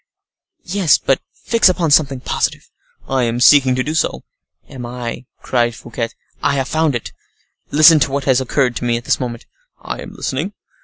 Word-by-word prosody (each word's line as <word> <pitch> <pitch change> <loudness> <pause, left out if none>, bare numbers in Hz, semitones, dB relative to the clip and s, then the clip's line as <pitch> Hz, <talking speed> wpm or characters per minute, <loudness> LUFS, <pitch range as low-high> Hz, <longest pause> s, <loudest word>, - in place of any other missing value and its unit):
"Yes; 180 -4 +2
but 135 - 0
fix 230 -4 +2
upon 175 -4 0
something 140 -3 +3
positive." - - -2 0.4
"I 135 -1 0
am 115 +1 -2
seeking 130 0 +5
to 130 - 0
do 155 - -3
so." 160 - -1 0.4
"And 125 -2 -8
I," 120 0 -6 0.2
cried 120 -2 0
Fouquet, 115 -1 -5 0.3
"I 140 - +1
have 135 -1 -1
found 155 -3 0
it. 120 - -5 0.6
Listen 155 +2 +7
to 135 - +1
what 140 0 -2
has 130 -1 +2
occurred 130 -1 0
to - - -5
me 120 -1 +1
at 120 - -9
this - - +1
moment." 120 -2 -5 0.3
"I - - -6
am - - -10
listening." 155 +10 -3
135 Hz, 185 wpm, -18 LUFS, 120-150 Hz, 0.6 s, Listen